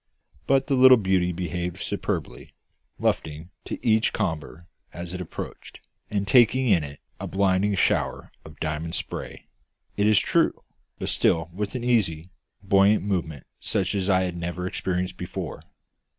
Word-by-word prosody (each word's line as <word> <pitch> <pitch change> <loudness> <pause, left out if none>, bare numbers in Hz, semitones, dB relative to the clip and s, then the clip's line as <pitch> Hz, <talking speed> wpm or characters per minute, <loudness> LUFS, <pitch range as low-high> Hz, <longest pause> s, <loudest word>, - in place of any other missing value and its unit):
But 135 0 +3
the 140 - -1
little 130 -1 +8
beauty 95 -4 +1
behaved 90 0 -4
superbly, - - -4 0.4
luffing 80 +3 -2
to - - -4
each 110 -1 +3
comber 85 -4 -3 0.3
as 85 +2 -7
it 90 - -4
approached, 90 - -8 0.3
and 100 -1 -1
taking 125 +3 +4
it 90 -6 +4
in 70 -1 -8 0.2
a - - -4
blinding 100 +1 +2
shower - - 0
of 80 -2 -14
diamond 80 +1 -3
spray, - - -6 0.5
it 100 +1 +3
is 110 -1 +5
true, - - +2 0.3
but - - -4
still 80 0 +1
with 100 +4 -4
an 125 - -3
easy, 95 -9 +1 0.3
buoyant 100 +1 +4
movement 85 -8 -3
such 95 -3 -1
as 100 -1 -1
I 95 -1 +4
had 90 -2 -3
never 85 +1 -4
experienced 90 0 -2
before. 90 - -6
95 Hz, 150 wpm, -25 LUFS, 85-105 Hz, 0.5 s, little